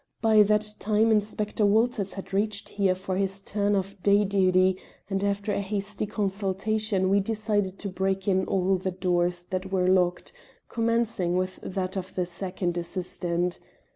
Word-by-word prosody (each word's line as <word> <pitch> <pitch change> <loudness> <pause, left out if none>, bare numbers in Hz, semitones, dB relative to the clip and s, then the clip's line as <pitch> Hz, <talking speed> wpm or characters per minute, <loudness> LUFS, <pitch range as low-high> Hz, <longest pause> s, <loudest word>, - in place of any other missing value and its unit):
By 220 -1 +5
that 210 +1 +4
time 220 +2 +2
Inspector 210 0 0
Walters 210 -1 +2
had 195 0 -8
reached 205 +1 -1
here 195 -2 +1
for 185 0 -4
his 195 0 0
turn 205 +1 0
of 195 0 -3
day 205 +1 +4
duty, 185 -1 +3 0.3
and 195 0 0
after 200 +1 -1
a - - -1
hasty 200 +1 -3
consultation 200 0 0
we 200 +2 +3
decided 205 -2 -1
to 205 - -4
break 190 +1 -2
in 190 -1 +2
all 190 0 +1
the 190 +1 -3
doors 180 -1 0
that 185 +1 -4
were 185 -2 +1
locked, 180 - +1 0.4
commencing 230 -6 0
with 185 0 -2
that 190 0 -3
of 185 0 -6
the 180 - 0
second 180 0 -3
assistant. 175 0 -2
195 Hz, 160 wpm, -26 LUFS, 185-210 Hz, 0.4 s, By